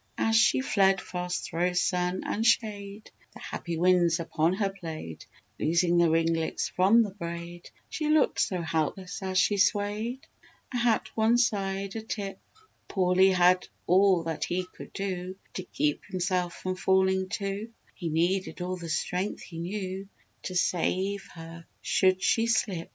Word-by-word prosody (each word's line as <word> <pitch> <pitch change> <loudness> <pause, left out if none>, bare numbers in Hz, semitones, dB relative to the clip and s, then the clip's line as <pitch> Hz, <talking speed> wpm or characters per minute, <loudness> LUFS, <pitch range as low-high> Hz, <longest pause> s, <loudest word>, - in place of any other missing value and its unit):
As 225 0 +1
she 225 +3 +4
fled 195 -6 +3
fast 180 0 -4
thro' 175 +2 -1
sun 180 0 0
and 220 - -1
shade, 210 -3 0 0.2
The - - -10
happy 170 -2 -5
winds 175 -1 +3
upon 165 0 0
her 195 0 0
played, 160 - -8 0.3
Loosing 170 +2 +2
the 170 -1 +4
ringlets 165 0 0
from 200 +6 +4
the 205 - -4
braid; 170 -2 -7 0.2
She 305 -1 -3
looked 305 -2 +3
so 180 -3 -1
helpless 165 +4 -2
as 190 -1 -2
she 205 +2 +3
swayed, 205 +5 0 0.5
Her 245 - -1
hat 235 -2 +1
one 225 +2 +3
side 195 -4 0
a 225 - -3
tip, 200 -3 -5 0.5
Pauly 185 0 +4
had 180 0 +4 0.2
all 185 -1 +4
that 165 -2 -2
he 180 +1 -2
could - - -10
do 185 -1 -4 0.2
To - - -4
keep 150 -4 -1
himself 180 -2 -1
from 185 0 -4
falling 190 0 +2
too; 200 +2 -4 0.2
He 170 -4 -4
needed 175 +5 0
all 180 +1 -3
the 170 -2 -7
strength 180 +5 -2
he 165 -2 -9
knew, 190 +2 -4 0.4
To 185 - -4
save 190 +3 0
her 165 0 -10 0.2
should 185 0 +2
she 225 0 +2
slip! 205 -7 0
185 Hz, 155 wpm, -28 LUFS, 175-200 Hz, 0.5 s, she